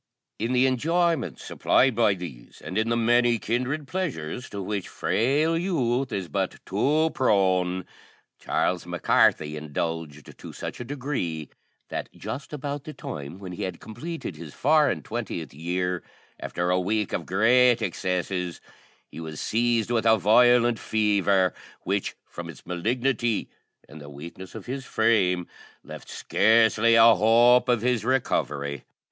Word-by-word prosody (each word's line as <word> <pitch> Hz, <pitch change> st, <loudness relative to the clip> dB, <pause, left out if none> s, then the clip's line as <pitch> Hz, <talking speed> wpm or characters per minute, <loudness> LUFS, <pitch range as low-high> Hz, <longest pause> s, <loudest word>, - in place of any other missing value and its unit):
In 115 Hz, +4 st, -1 dB
the 125 Hz, +1 st, +4 dB
enjoyments 150 Hz, -, 0 dB
supplied 130 Hz, 0 st, +2 dB
by 110 Hz, -3 st, +3 dB
these, 85 Hz, -10 st, -10 dB
and 90 Hz, -, -6 dB
in 110 Hz, +2 st, +1 dB
the 115 Hz, -, +1 dB
many 120 Hz, +1 st, +3 dB
kindred 130 Hz, +7 st, -2 dB
pleasures 130 Hz, -, -4 dB
to 100 Hz, -, -6 dB
which 100 Hz, 0 st, -3 dB
frail 145 Hz, +8 st, +1 dB
youth 135 Hz, -8 st, 0 dB
is 95 Hz, -4 st, -3 dB
but 75 Hz, -, -2 dB
too 150 Hz, +11 st, +1 dB
prone, 95 Hz, -6 st, +1 dB, 0.5 s
Charles 90 Hz, -1 st, -1 dB
Mac 90 Hz, -1 st, -6 dB
Carthy 75 Hz, 0 st, +3 dB
indulged 75 Hz, 0 st, -5 dB
to -, -, -9 dB
such -, -, -6 dB
a -, -, -4 dB
degree, 120 Hz, -, -4 dB, 0.4 s
that -, -, -4 dB
just 140 Hz, -, -7 dB
about 145 Hz, -1 st, -4 dB
the 155 Hz, -, -8 dB
time 75 Hz, -, -7 dB
when 95 Hz, -2 st, -8 dB
he 90 Hz, -, -7 dB
had 95 Hz, -2 st, -4 dB
completed 120 Hz, -, -7 dB
his 80 Hz, -2 st, -10 dB
four 150 Hz, +1 st, +4 dB
and -, -, -3 dB
twentieth 110 Hz, -, -5 dB
year, 90 Hz, +3 st, -2 dB, 0.4 s
after 90 Hz, +1 st, -2 dB
a 90 Hz, -, +2 dB
week 105 Hz, +2 st, -1 dB
of -, -, -3 dB
great 120 Hz, +5 st, +4 dB
excesses, 90 Hz, -2 st, -2 dB, 0.5 s
he -, -, -9 dB
was 80 Hz, -2 st, -7 dB
seized 115 Hz, 0 st, 0 dB
with 115 Hz, -2 st, +1 dB
a 110 Hz, 0 st, +6 dB
violent 120 Hz, +3 st, +4 dB
fever, 100 Hz, -4 st, +2 dB, 0.3 s
which, 100 Hz, +1 st, -2 dB
from -, -, -8 dB
its -, -, -12 dB
malignity, 120 Hz, +5 st, -1 dB, 0.4 s
and 75 Hz, +1 st, -12 dB
the 70 Hz, -, -10 dB
weakness 85 Hz, +6 st, -10 dB
of -, -, -8 dB
his 135 Hz, +2 st, -5 dB
frame, 100 Hz, -7 st, +2 dB, 0.4 s
left -, -, -10 dB
scarcely 115 Hz, 0 st, +3 dB
a 115 Hz, 0 st, +8 dB
hope 120 Hz, +4 st, +5 dB
of 120 Hz, -3 st, +2 dB
his 125 Hz, -3 st, +1 dB
recovery. 70 Hz, -, -1 dB
110 Hz, 150 wpm, -25 LUFS, 90-125 Hz, 0.5 s, a